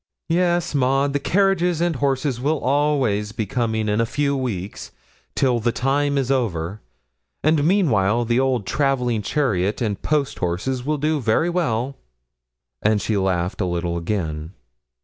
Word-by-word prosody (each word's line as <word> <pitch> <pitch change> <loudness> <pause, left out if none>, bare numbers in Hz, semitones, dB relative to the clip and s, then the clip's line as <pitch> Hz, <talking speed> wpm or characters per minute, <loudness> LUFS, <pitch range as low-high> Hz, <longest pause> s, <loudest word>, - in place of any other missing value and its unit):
'Yes, 175 0 +1
Maud, 135 +1 +2
the 145 - +1
carriage 195 +4 +2
and 175 -3 +1
horses 135 -2 0
will 155 +4 +1
always 130 -7 +1
be 110 -2 -2
coming 110 0 -1
in 105 +2 +1
a - - +2
few 140 +2 0
weeks, 105 -8 -4 0.5
till 125 -3 +2
the 120 +1 +1
time 140 +3 0
is 135 -1 0
over; 105 -6 -1 0.6
and 155 -1 +3
meanwhile 120 - +2
the 120 +2 +2
old 130 -5 +1
travelling 125 0 0
chariot 105 - 0
and 105 -5 -2
post 150 -3 0
horses 100 +9 -2
will 150 +3 0
do 155 +1 0
very 130 +8 +1
well;' 135 -6 -1 0.8
and 110 0 +2
she 110 - -1
laughed 95 -1 0
a - - +1
little 85 -1 -2
again. 85 -3 -3
125 Hz, 150 wpm, -22 LUFS, 105-145 Hz, 0.8 s, and